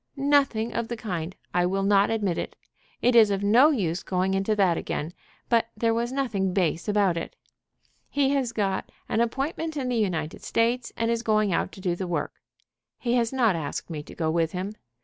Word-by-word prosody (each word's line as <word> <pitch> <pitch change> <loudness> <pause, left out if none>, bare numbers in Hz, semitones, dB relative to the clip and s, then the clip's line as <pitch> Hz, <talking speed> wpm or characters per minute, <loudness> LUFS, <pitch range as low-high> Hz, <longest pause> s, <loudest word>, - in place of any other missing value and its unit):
"Nothing 275 -5 +2
of 235 -1 -2
the 235 - -4
kind! 180 -5 -4 0.2
I 180 0 +3
will 195 +1 0
not 200 0 +4
admit 205 -6 0
it. - - -5 0.5
It 245 0 +4
is 220 -3 +7
of 200 0 -1
no 240 +9 +6
use 185 - 0
going 185 +1 0
into 195 +3 +1
that 190 -4 +3
again, 160 +1 -4 0.3
but 230 -1 +3
there 230 +1 +2
was 235 +2 -1
nothing 210 -9 -1
base 175 -1 0
about 200 -4 +2
it. 165 - -5 0.7
He 280 -1 +2
has 270 -4 0
got 195 -4 -2 0.2
an 225 - +1
appointment 295 +6 -2
in 260 -3 -2
the 245 - 0
United 175 -8 -1
States, 235 +2 0
and 230 0 +1
is 230 0 0
going 215 -4 +2
out - - 0
to 190 - -11
do 180 -2 0
the 185 +1 -4
work. 175 - -3 0.6
He 240 -1 -1
has 235 -2 +2
not 235 -8 +2
asked 160 +2 -4
me 155 -2 -4
to - - -13
go 160 -1 0
with 165 -1 0
him. 190 +3 -3
210 Hz, 205 wpm, -26 LUFS, 180-235 Hz, 0.7 s, is